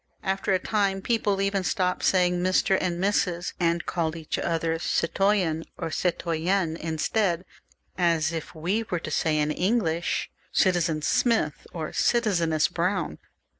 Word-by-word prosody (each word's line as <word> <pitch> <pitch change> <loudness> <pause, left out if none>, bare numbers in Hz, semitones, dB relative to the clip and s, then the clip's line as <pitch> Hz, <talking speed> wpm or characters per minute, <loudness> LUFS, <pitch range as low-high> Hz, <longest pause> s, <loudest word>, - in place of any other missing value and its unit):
After 195 +1 -1
a 190 - +4
time 195 0 0
people 205 -4 +1
even 195 0 +1
left 185 - -2
off 180 0 +1
saying 180 -1 +3
Mr. 185 +1 +2
and 175 -2 -1
Mrs., 180 -3 0
and 170 -1 +1
called 165 -2 -1
each 160 -2 -4
other 165 -1 -1
citoyen 175 -2 +1
or 165 -2 -4
citoyenne 170 0 0
instead, 170 +3 0 0.5
as 165 -2 +2
if 165 +1 -6
we 180 +8 0
were 180 - 0
to 155 - -6
say 155 +1 +1
in 150 0 +1
English 175 -2 0 0.2
Citizen 170 -4 +2
Smith, 220 - +1
or 160 -3 -5
Citizeness 170 -10 +2
Brown. 175 - -1
175 Hz, 140 wpm, -26 LUFS, 165-195 Hz, 0.5 s, a